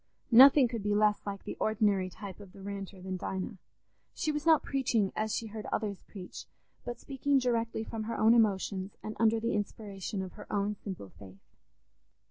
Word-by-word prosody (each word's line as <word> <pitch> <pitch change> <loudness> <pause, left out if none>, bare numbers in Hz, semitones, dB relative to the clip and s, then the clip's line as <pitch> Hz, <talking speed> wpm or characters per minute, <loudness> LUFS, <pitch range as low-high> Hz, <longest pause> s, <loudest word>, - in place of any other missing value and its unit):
Nothing 260 +2 +9
could 230 -2 -4
be 205 +1 0
less 210 0 +3
like 200 -1 -4
the - - -5
ordinary 205 -3 +2
type 195 +1 -9
of 200 -3 -13
the 195 - -12
Ranter 195 -1 -6
than 185 0 -3
Dinah. 190 +2 -4 0.6
She 310 - 0
was 300 +2 -3
not 320 -2 +6
preaching 235 -7 0
as 215 0 -1
she 230 - -2
heard 215 -1 -7
others 205 -3 -2
preach, 185 -3 -9 0.4
but 240 0 -6
speaking 275 +1 0
directly 230 -3 0
from 220 -1 -5
her 230 - -3
own 220 +2 +5
emotions 200 -3 +1
and 215 - -5
under 225 0 +4
the 230 +1 -1
inspiration 200 -1 -4
of 185 - -7
her - - -11
own 205 0 0
simple 190 - -8
faith. 95 -1 -13
210 Hz, 185 wpm, -31 LUFS, 195-230 Hz, 0.6 s, Nothing